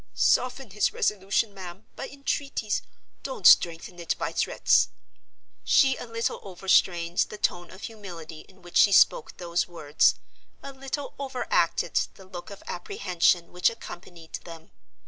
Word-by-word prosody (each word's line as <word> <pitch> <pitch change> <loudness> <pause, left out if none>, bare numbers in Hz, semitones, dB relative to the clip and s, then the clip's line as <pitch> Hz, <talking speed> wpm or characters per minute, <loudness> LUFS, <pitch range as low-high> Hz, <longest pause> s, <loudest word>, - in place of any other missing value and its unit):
Soften 255 -2 +1
his 210 +2 +1
resolution, 200 +1 0
ma'am, 190 0 -9
by 270 - -6
entreaties; 275 -5 -2 0.4
don't 260 -9 -6
strengthen 170 0 +5
it 170 - -1
by - - -2
threats!" - - +2 0.7
She 265 -2 +4
a 245 - -8
little 230 0 -2
overstrained 180 -2 +1
the 210 - -8
tone 175 -3 -1
of 190 - -13
humility 175 -8 -8
in 190 -1 -21
which 175 - -3
she 200 - +6
spoke 480 - +4
those 170 -1 -1
words—a 165 - -1
little 270 +1 -5
overacted 265 -2 0
the 190 - -14
look 180 -2 -9
of 200 - -11
apprehension 175 -1 0
which 180 0 +3
accompanied 175 -7 -9
them. 165 -2 -12
190 Hz, 135 wpm, -26 LUFS, 175-230 Hz, 0.7 s, she